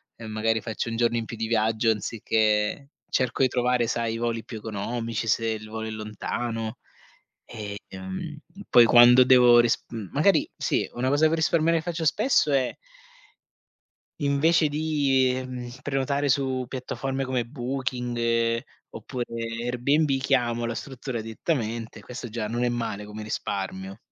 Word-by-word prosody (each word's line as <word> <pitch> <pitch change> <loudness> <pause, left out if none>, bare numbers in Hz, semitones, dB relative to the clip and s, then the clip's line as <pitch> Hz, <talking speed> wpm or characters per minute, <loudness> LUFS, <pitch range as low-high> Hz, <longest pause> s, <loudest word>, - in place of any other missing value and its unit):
e 115 -1 -9
magari 110 +1 0
faccio 115 +1 -4
1 115 - -3
giorno 120 0 +2
in 115 - -2
più 115 - -8
di 110 0 -2
viaggio 110 0 +2
anziché 110 +4 0 0.2
cerco 130 +1 +1
di - - +5
trovare 125 -1 +1
sai 115 -1 -1
i - - -3
voli 115 -1 -2
più 115 -1 -8
economici, 115 +2 -3
se 115 +1 +1
il 110 -1 -4
volo 110 0 -5
è - - -5
lontano. 110 +1 -4 0.7
E, 105 -3 -7
mhmm, 95 0 -6 0.3
poi 120 -1 +8
quando 120 +2 +8
devo 125 -2 +7
risp 120 -1 +1
mhmm, 110 -4 -6
magari 200 - +3
sì, - - 0
una 125 +2 -1
cosa 150 +3 +4
per 165 +1 0
risparmiare 165 +1 +2
che - - -8
faccio 170 -2 -3
spesso 210 - +3
è 135 -2 +1 1.5
invece 150 +3 +3
di, 145 -4 +2
mhmm, 125 -1 -6
prenotare 140 +1 -1
su 130 -2 +1
piattaforme 135 +1 -3
come 125 -3 -1
Booking 120 -3 -1 0.3
oppure 125 -3 -5 0.4
Airbnb, 135 +4 +1
chiamo 120 -3 +1
la 115 - -3
struttura 130 -2 -5
direttamente; 115 -2 -3
questo 125 +2 -7
già 110 -1 -4
non 120 +1 0
è - - +2
male 115 -4 -3
come 105 +1 -8
risparmio. 95 -1 -4
120 Hz, 150 wpm, -26 LUFS, 110-135 Hz, 1.5 s, poi